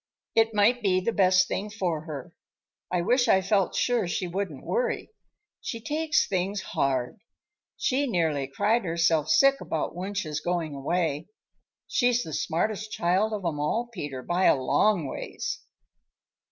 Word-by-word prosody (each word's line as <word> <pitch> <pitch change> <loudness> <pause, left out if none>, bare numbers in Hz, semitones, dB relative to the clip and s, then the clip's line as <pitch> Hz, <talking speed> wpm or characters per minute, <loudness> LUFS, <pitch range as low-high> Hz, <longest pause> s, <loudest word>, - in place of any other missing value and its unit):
It 225 -1 +3
might 230 +4 +4
be 190 -3 +2
the 200 +5 -1
best 185 -2 +4
thing 210 +2 -3
for 175 -7 -2
her. 145 -6 -7 0.6
I 180 -1 +1
wish 245 +7 +2
I 190 - +5
felt 195 0 +1
sure 245 -6 +1
she 180 - -2
wouldn't 175 -5 -4
worry. 485 -1 -1 0.5
She 230 - -5
takes 305 +7 0
things 195 +1 -1
hard. 130 -3 -1 0.6
She 280 +1 +1
nearly 160 - 0
cried 210 - +1
herself 165 -3 +1
sick 275 +11 +5
about 160 - -2
Wunsch's 180 -4 -3
going 170 -3 -2
away. 150 +2 -1 0.6
She's 245 -1 +2
the 160 - -7
smartest 215 +8 -1
child 190 +3 +1
of 205 -4 -4
'em 155 -3 -1
all, 225 +11 -1
Peter, 145 - -5
by 180 +2 +1
a - - +6
long 165 +7 +2
ways." 135 - -5
185 Hz, 150 wpm, -27 LUFS, 160-220 Hz, 0.6 s, a